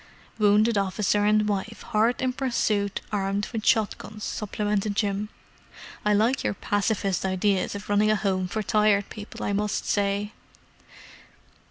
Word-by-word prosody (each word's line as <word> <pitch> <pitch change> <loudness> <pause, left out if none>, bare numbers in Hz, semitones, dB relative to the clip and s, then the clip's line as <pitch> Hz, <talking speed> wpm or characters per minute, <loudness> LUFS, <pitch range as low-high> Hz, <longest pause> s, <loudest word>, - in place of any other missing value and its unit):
"Wounded 210 +1 +4
officer 205 +1 +1
and 210 0 +3
wife 210 +2 -3
hard 225 +4 +2
in 255 -1 +1
pursuit 215 -6 0
armed 200 0 -1
with 220 -2 -3
shot 220 -4 +3
guns!" 210 0 -9
supplemented 210 0 -2
Jim. 205 0 -1 0.7
"I 210 - +2
like 225 +6 +2
your - - -1
pacifist 200 -2 0
ideas 190 +1 0
of 205 - -7
running 205 +1 +3
a 215 - +4
home 190 -3 0
for 215 +4 -3
Tired 210 -1 +2
People, 210 -2 -7
I 205 - -1
must 210 0 -1
say!" 200 0 0
205 Hz, 145 wpm, -26 LUFS, 200-215 Hz, 0.7 s, Wounded